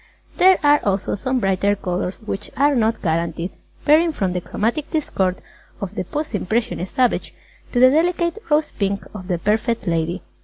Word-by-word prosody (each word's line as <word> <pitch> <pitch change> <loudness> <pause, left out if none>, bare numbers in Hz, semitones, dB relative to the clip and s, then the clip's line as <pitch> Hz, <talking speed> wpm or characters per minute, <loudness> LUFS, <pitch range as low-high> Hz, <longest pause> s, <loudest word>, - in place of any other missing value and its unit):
There 375 0 +6
are 290 0 +5
also 200 -1 0
some 255 +5 -1
brighter 195 0 +1
colours, 180 -1 -3
which 200 -1 -4
are 285 +2 +4
not 225 -3 +1
guaranteed, 165 +1 -1 0.3
varying 320 +2 +5
from 190 -9 -1
the 180 - -2
chromatic 235 - -2
discord 190 - -1 0.4
of 200 -1 -5
the 210 - -3
post 300 - -4
impressionist 215 -3 -2
Savage 255 -2 +1 0.4
to 245 - +1
the 255 +1 +7
delicate 340 +4 +1
rose 305 +1 +2
pink 200 0 -2
of 185 -4 -8
the 180 -2 0
Perfect 220 +5 0
Lady. 170 +1 -1
210 Hz, 165 wpm, -21 LUFS, 185-290 Hz, 0.4 s, the